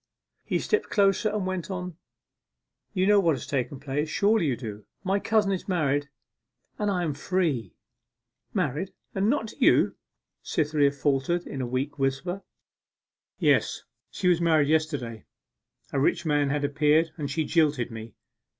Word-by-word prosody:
He -, -, 0 dB
stepped 430 Hz, 0 st, 0 dB
closer, 200 Hz, +1 st, +3 dB
and 210 Hz, -2 st, -2 dB
went 185 Hz, -2 st, -3 dB
on, 180 Hz, -2 st, -4 dB, 1.0 s
'You 185 Hz, -2 st, +1 dB
know 205 Hz, 0 st, +6 dB
what 165 Hz, -6 st, +3 dB
has 125 Hz, -, -7 dB
taken 140 Hz, 0 st, -2 dB
place? 145 Hz, +2 st, -2 dB
Surely 200 Hz, 0 st, +2 dB
you 130 Hz, -4 st, 0 dB
do? 105 Hz, -4 st, -7 dB, 0.2 s
my 195 Hz, +1 st, +1 dB
cousin 210 Hz, -1 st, +2 dB
is 190 Hz, -, -3 dB
married, 145 Hz, -6 st, 0 dB, 0.7 s
and 210 Hz, -1 st, +1 dB
I 180 Hz, -3 st, 0 dB
am 155 Hz, -4 st, -1 dB
free.' 150 Hz, -, -1 dB, 0.8 s
'Married 165 Hz, +9 st, -1 dB, 0.2 s
and 200 Hz, +2 st, +1 dB
not 240 Hz, -4 st, 0 dB
to -, -, -13 dB
you?' -, -, +4 dB, 0.5 s
Cytherea 150 Hz, -2 st, +1 dB
faltered, 145 Hz, +4 st, 0 dB
in 135 Hz, -, -5 dB
a 125 Hz, -, -2 dB
weak 130 Hz, +4 st, -3 dB
whisper. 135 Hz, +8 st, -1 dB, 1.0 s
'Yes, -, -, +2 dB, 0.3 s
she 185 Hz, -, -2 dB
was 175 Hz, -1 st, +4 dB
married 160 Hz, -4 st, +3 dB
yesterday! 145 Hz, -8 st, -1 dB, 0.7 s
A 140 Hz, -, +1 dB
rich 170 Hz, +5 st, +1 dB
man 145 Hz, -2 st, +2 dB
had 145 Hz, +1 st, -1 dB
appeared, 150 Hz, +3 st, +3 dB
and 145 Hz, -3 st, -3 dB
she 155 Hz, +2 st, -1 dB
jilted 150 Hz, -7 st, +2 dB
me. 110 Hz, 0 st, -8 dB
155 Hz, 155 wpm, -27 LUFS, 140-185 Hz, 1.0 s, know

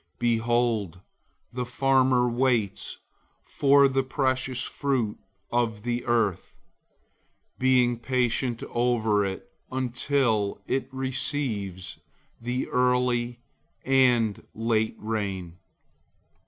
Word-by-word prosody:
Behold, 115 Hz, -5 st, 0 dB, 0.5 s
the 125 Hz, 0 st, -2 dB
farmer 130 Hz, 0 st, +2 dB
waits 120 Hz, -4 st, 0 dB, 0.5 s
for 140 Hz, 0 st, +4 dB
the 135 Hz, 0 st, +1 dB
precious 130 Hz, -1 st, -1 dB
fruit 130 Hz, -7 st, -1 dB, 0.3 s
of 115 Hz, -3 st, 0 dB
the 120 Hz, 0 st, -2 dB
earth, 105 Hz, -6 st, 0 dB, 1.0 s
being 125 Hz, -2 st, +3 dB
patient 125 Hz, 0 st, 0 dB
over 115 Hz, -4 st, +2 dB
it, 95 Hz, 0 st, -4 dB, 0.2 s
until 125 Hz, -5 st, 0 dB
it 135 Hz, -, -2 dB
receives 130 Hz, -8 st, -3 dB, 0.4 s
the 125 Hz, +2 st, -2 dB
early 125 Hz, -1 st, +1 dB, 0.4 s
and 125 Hz, -5 st, +3 dB
late 110 Hz, -1 st, 0 dB
rain. 100 Hz, -5 st, -4 dB
120 Hz, 85 wpm, -26 LUFS, 110-130 Hz, 1.0 s, for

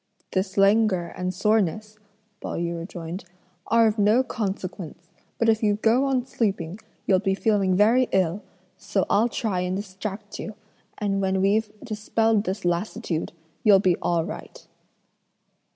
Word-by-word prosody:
"This 190 Hz, +1 st, -2 dB
languor 195 Hz, -3 st, +3 dB
and 180 Hz, 0 st, -2 dB
soreness," 215 Hz, +2 st, 0 dB, 0.4 s
Pao -, -, -4 dB
yü 170 Hz, 0 st, -2 dB
rejoined, 170 Hz, +1 st, -6 dB, 0.4 s
"are 230 Hz, +1 st, +5 dB
of 215 Hz, 0 st, +1 dB
no 215 Hz, +5 st, +4 dB
consequence; 190 Hz, -7 st, -5 dB, 0.3 s
but 230 Hz, -, +1 dB
if 220 Hz, -1 st, +3 dB
you 210 Hz, -2 st, +3 dB
go 230 Hz, +5 st, +3 dB
on 260 Hz, -2 st, 0 dB
sleeping 195 Hz, -7 st, -2 dB, 0.3 s
you'll 190 Hz, -2 st, +4 dB
be 195 Hz, -1 st, 0 dB
feeling 200 Hz, -3 st, +2 dB
very 230 Hz, +6 st, +4 dB
ill; 185 Hz, +1 st, +1 dB, 0.4 s
so -, -, 0 dB
I'll 225 Hz, +4 st, +4 dB
try 210 Hz, -6 st, -1 dB
and 180 Hz, +1 st, -1 dB
distract 200 Hz, +1 st, -6 dB
you, 215 Hz, -, -6 dB, 0.4 s
and 195 Hz, -1 st, -1 dB
when 190 Hz, 0 st, +1 dB
we've 205 Hz, +3 st, +2 dB
dispelled 220 Hz, -1 st, +1 dB
this 190 Hz, 0 st, -3 dB
lassitude, 175 Hz, 0 st, -2 dB, 0.3 s
you'll 205 Hz, -3 st, +7 dB
be 185 Hz, -2 st, +3 dB
all 170 Hz, -2 st, +1 dB
right." 205 Hz, -, -9 dB
200 Hz, 145 wpm, -25 LUFS, 185-220 Hz, 0.4 s, you'll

